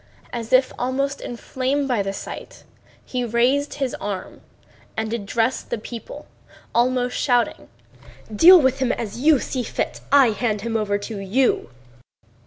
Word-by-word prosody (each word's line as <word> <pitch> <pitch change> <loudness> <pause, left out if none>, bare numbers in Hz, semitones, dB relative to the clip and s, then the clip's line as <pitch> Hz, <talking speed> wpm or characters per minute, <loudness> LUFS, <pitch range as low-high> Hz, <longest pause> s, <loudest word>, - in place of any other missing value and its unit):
As 230 -1 -5
if 255 0 +4
inflamed 265 +1 -2
by 245 -6 +1
the 195 0 -2
sight, 195 - -8 0.4
he 250 -1 -2
raised 245 +5 +1
his 270 -3 -2
arm 200 -3 -5 0.6
and 220 0 -2
addressed 230 +3 -1
the - - -1
people, 230 +1 -9 0.5
almost 250 +1 +1
shouting: 245 -3 0 0.7
"Deal 355 - +9
with 265 -2 +2
him 260 -2 +1
as 225 0 -4
you 300 +2 +5
think 255 -1 -3
fit! - - -3
I 275 -4 +6
hand 215 -2 -1
him 225 +1 -3
over 205 -2 +1
to 205 +1 -6
you." 205 - +1
245 Hz, 140 wpm, -22 LUFS, 220-265 Hz, 0.7 s, Deal